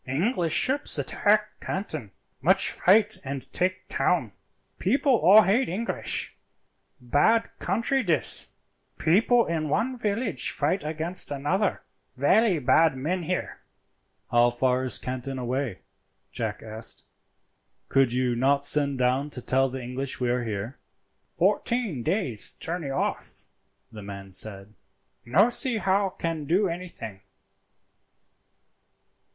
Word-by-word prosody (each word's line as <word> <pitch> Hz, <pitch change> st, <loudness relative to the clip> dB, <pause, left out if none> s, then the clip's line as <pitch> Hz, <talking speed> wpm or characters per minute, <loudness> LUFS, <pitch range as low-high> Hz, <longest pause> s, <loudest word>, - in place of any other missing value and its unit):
English 170 Hz, -, 0 dB
ships 260 Hz, -, +2 dB
attack 210 Hz, +1 st, +1 dB
Canton, 155 Hz, -, -5 dB, 0.3 s
much -, -, +3 dB
fight 205 Hz, +1 st, +3 dB
and 135 Hz, -1 st, -6 dB
take 185 Hz, +1 st, -1 dB
town, 130 Hz, -, 0 dB, 0.5 s
people 270 Hz, -, +2 dB
all 205 Hz, +5 st, +7 dB
hate 225 Hz, +8 st, +2 dB
English. 215 Hz, +7 st, -3 dB, 0.6 s
Bad 145 Hz, -, +2 dB
country 270 Hz, +4 st, 0 dB
dis. 175 Hz, -9 st, +1 dB, 0.5 s
People 225 Hz, +8 st, +3 dB
in 160 Hz, -2 st, -2 dB
one 255 Hz, -, 0 dB
village 205 Hz, -, -1 dB
fight 160 Hz, +7 st, -1 dB
against 160 Hz, +4 st, -3 dB
another. 150 Hz, +8 st, -1 dB, 0.3 s
Velly 190 Hz, -, +3 dB
bad 140 Hz, +2 st, +3 dB
men 170 Hz, +8 st, -2 dB
here." 180 Hz, +2 st, -3 dB, 0.7 s
"How 120 Hz, 0 st, +5 dB
far 125 Hz, +1 st, 0 dB
is 130 Hz, -, -2 dB
Canton 130 Hz, +1 st, -5 dB
away?" 125 Hz, -4 st, -3 dB, 0.5 s
Jack 110 Hz, -3 st, -4 dB
asked. 110 Hz, 0 st, -6 dB, 0.8 s
"Could 135 Hz, -3 st, +3 dB
you 125 Hz, -1 st, 0 dB
not 140 Hz, +3 st, +2 dB
send 140 Hz, -2 st, +1 dB
down 130 Hz, +3 st, +1 dB
to 135 Hz, -, -7 dB
tell 135 Hz, +2 st, +1 dB
the 130 Hz, 0 st, -6 dB
English 130 Hz, +2 st, -4 dB
we 125 Hz, -1 st, 0 dB
are 125 Hz, 0 st, 0 dB
here?" 110 Hz, +4 st, -5 dB, 0.6 s
"Fourteen 230 Hz, -, 0 dB
days' 130 Hz, -, -1 dB
journey 165 Hz, -3 st, -3 dB
off," 135 Hz, -, -3 dB, 0.5 s
the 110 Hz, -, -9 dB
man 100 Hz, -1 st, -9 dB
said; 100 Hz, +1 st, -3 dB, 0.5 s
"no 180 Hz, -, +4 dB
see 245 Hz, -1 st, +1 dB
how 195 Hz, -1 st, +1 dB
can 165 Hz, -4 st, -4 dB
do 185 Hz, +7 st, +2 dB
anything." 170 Hz, -, -7 dB
150 Hz, 120 wpm, -26 LUFS, 125-195 Hz, 0.8 s, all